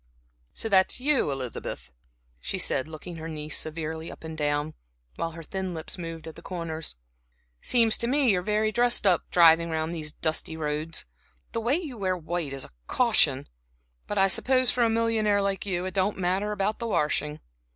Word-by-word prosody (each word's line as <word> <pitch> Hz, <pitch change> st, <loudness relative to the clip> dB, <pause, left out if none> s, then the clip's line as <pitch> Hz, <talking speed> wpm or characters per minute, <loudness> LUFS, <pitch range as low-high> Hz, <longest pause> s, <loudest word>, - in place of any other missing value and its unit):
"So -, -, -1 dB
that's 190 Hz, 0 st, +3 dB
you, 275 Hz, -, +3 dB
Elizabeth," 130 Hz, -3 st, -5 dB, 0.5 s
she -, -, -3 dB
said, 130 Hz, -, +2 dB
looking 160 Hz, +2 st, -8 dB
her 160 Hz, 0 st, -6 dB
niece 155 Hz, -1 st, -3 dB
severely 160 Hz, +1 st, -3 dB
up -, -, -13 dB
and 160 Hz, 0 st, -6 dB
down, 150 Hz, 0 st, -1 dB, 0.4 s
while 165 Hz, -1 st, -3 dB
her 165 Hz, 0 st, -9 dB
thin 190 Hz, +1 st, -4 dB
lips 160 Hz, -, -5 dB
moved 165 Hz, -1 st, -6 dB
at 160 Hz, -, -7 dB
the -, -, -12 dB
corners. 165 Hz, -, -4 dB, 0.7 s
"It -, -, -11 dB
seems 230 Hz, -3 st, +4 dB
to 235 Hz, -, 0 dB
me 270 Hz, -1 st, +4 dB
you're 180 Hz, -2 st, +1 dB
very 210 Hz, +3 st, +1 dB
much -, -, -7 dB
dressed 240 Hz, -2 st, +3 dB
up, 180 Hz, -4 st, +3 dB
driving 170 Hz, -1 st, +6 dB
round 160 Hz, +1 st, -2 dB
these 155 Hz, -2 st, -3 dB
dusty 160 Hz, +1 st, -1 dB
roads. 155 Hz, +1 st, -2 dB, 0.5 s
The 230 Hz, -, -2 dB
way 240 Hz, +5 st, +2 dB
you 300 Hz, -9 st, -5 dB
wear 185 Hz, -2 st, 0 dB
white 170 Hz, -3 st, -3 dB
is 135 Hz, -1 st, -4 dB
a -, -, -15 dB, 0.2 s
caution! -, -, +3 dB, 0.6 s
But 205 Hz, -, -3 dB
I 195 Hz, 0 st, +5 dB
suppose 255 Hz, +6 st, +3 dB
for 245 Hz, -, +2 dB
a 230 Hz, -, +3 dB
millionaire 225 Hz, -2 st, +2 dB
like 200 Hz, 0 st, -1 dB
you 180 Hz, -2 st, -1 dB
it 185 Hz, -, -4 dB
don't 195 Hz, +1 st, +1 dB
matter 190 Hz, +3 st, 0 dB
about 210 Hz, +1 st, -1 dB
the 235 Hz, -, -3 dB
washing." 150 Hz, -5 st, 0 dB
175 Hz, 195 wpm, -27 LUFS, 160-210 Hz, 0.7 s, driving